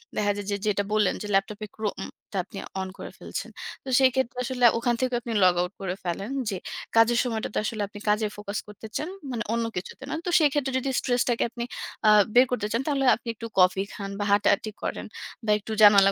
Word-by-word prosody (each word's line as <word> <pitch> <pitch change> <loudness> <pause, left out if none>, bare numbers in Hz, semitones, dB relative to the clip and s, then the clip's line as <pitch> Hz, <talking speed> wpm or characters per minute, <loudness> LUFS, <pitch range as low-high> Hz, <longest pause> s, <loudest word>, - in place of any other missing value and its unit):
দেখা 205 -1 +2
যায় 205 -1 -5
যে - - +1
যেটা 205 -1 +1
বললেন 210 -3 +3
যে 210 - -4
ল্যাপটপে 205 +2 0
Chrome 215 -2 -3 0.3
টা 200 - -3
আপনি 195 - -12 0.2
on 190 - -3
করে - - -7
ফেলছেন। - - -6 0.3
তো 265 - -7
সেক্ষেত্রে 260 -2 +2
আসলে 250 -1 +1
ওখান 240 +1 +1
থেকেও 255 -1 +1
আপনি 235 -2 -4
log 180 -1 +6
out 180 +2 -3
করে 185 -2 -2
ফেলেন। 185 +4 -3 0.2
যে 195 - -2 0.4
কাজের 230 +1 +5
সময়টাতে 225 -4 -3
আসলে 215 0 -2
আপনি 205 +1 -11
কাজে 210 +1 +2
focus 205 0 -4
করতে 210 +1 -10
চান, 310 - -3 0.2
মানে 230 -2 -2
অন্য 230 0 0
কিছুতে 180 - -6
না। - - -3
তো - - -1
সেক্ষেত্রে 290 -3 +2
যদি 270 - -2
stress-টাকে 245 -2 +1
আপনি, 235 +1 -5 0.4
আ - - +8 0.3
বের 250 +1 +8
করতে 245 -4 0
চান 230 - +1
তাহলে 275 -2 +1
আপনি 240 - -15
একটু 230 +1 -6
coffee 185 +2 +4
খান 200 -1 -5
বা 205 - 0
হাঁটাহাঁটি 205 +1 +3
করেন - - -3 0.4
বা 210 - +2
একটু 210 - -8
জানালা 200 -2 +8
215 Hz, 210 wpm, -26 LUFS, 200-245 Hz, 0.4 s, আ